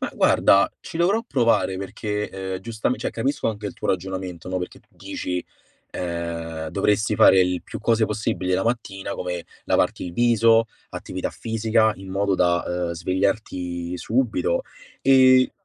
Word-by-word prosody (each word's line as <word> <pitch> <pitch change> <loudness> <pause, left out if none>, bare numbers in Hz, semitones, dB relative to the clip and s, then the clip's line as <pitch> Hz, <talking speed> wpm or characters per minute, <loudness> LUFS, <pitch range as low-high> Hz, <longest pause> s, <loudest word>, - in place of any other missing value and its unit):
ma - - -2
guarda, 100 - +4
ci - - -8
dovrò 195 +7 +2
provare 115 - +2
perché, 105 +2 -3 0.3
uhm, - - -3
giustam 115 +3 -2
cioè - - -3
capisco 135 +2 -1
anche 105 -1 -4
il 100 - -5
tuo - - -5
ragionamento 95 -2 -3
no, 95 0 -1
perché 90 - -7
tu - - -35
dici, 90 -1 -4 0.5
uhm: 85 -2 -4
"Dovresti 105 +2 +1
fare 95 -1 +7
il 90 -1 +1
più - - -7
cose 115 -1 +2
possibili 95 -4 -2
la 95 +3 +1
mattina, 110 -5 -2
come 90 -1 -4 0.2
lavarti - - +1
il 85 - -7
viso, 115 0 +4 0.3
attività 95 - -5
fisica 110 -1 +1
in 95 0 -10
modo 100 0 +1
da, 85 -1 +2
uhm, 90 -1 -2
svegliarti 90 -1 -2
subito. 130 - 0 0.4
E" 130 -1 +6
100 Hz, 155 wpm, -23 LUFS, 90-115 Hz, 0.5 s, fare